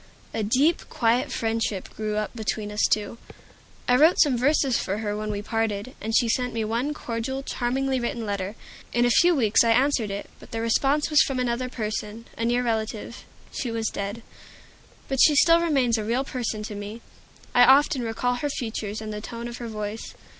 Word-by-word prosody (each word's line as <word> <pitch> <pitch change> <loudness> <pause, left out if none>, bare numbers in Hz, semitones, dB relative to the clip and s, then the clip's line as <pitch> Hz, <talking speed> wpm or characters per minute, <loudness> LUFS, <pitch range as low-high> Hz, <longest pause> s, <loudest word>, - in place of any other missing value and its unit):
A 225 - -1
deep, 265 +10 +2
quiet 235 +1 +1
friendship 225 -3 -1
grew 215 -1 -2
up 215 +3 -3
between 215 -2 -3
us 210 - +2
two. 215 +2 -1 0.7
I 250 - +4
wrote 310 +6 +5
some 285 -5 +5
verses 265 0 +2
for 195 +2 -2
her 210 -1 -2
when 215 0 -4
we 205 -1 -3
parted, 225 +1 -2
and 220 +2 +1
she 240 - +3
sent 250 +1 0
me 225 -1 -1
one 235 +7 -1
cordial, 250 +2 -4
charmingly 265 +1 -1
written 235 -1 -3
letter. 200 0 -3 0.4
In 240 +1 +3
a 240 - +3
few 345 +7 +5
weeks 225 -5 +4
I 230 - +2
answered 245 -2 +2
it; 200 +1 -5
but - - -14
the 225 - -4
response 275 +7 +1
was 300 - +6
from 270 - 0
another 250 0 -1
person, 220 -1 -4
a 230 - -2
near 240 +1 +1
relative. 225 0 -3 0.3
She 250 - -3
was 225 -1 -1
dead. 200 +3 -5 0.8
But 270 -1 -2
she 300 - +6
still 335 +3 +6
remains 265 -9 +2
a - - -2
real 235 +5 0
person 235 -5 -3
to 210 - -6
me; 205 +3 -7 0.5
I 245 - +7
often 270 +1 +5
recall 245 +2 -1
her 290 +4 -2
features 220 -5 -4
and 215 -1 -5
the 210 - -5
tone 235 +2 -6
of 240 0 -7
her 240 - -6
voice. 215 0 -6
230 Hz, 195 wpm, -25 LUFS, 215-255 Hz, 0.8 s, I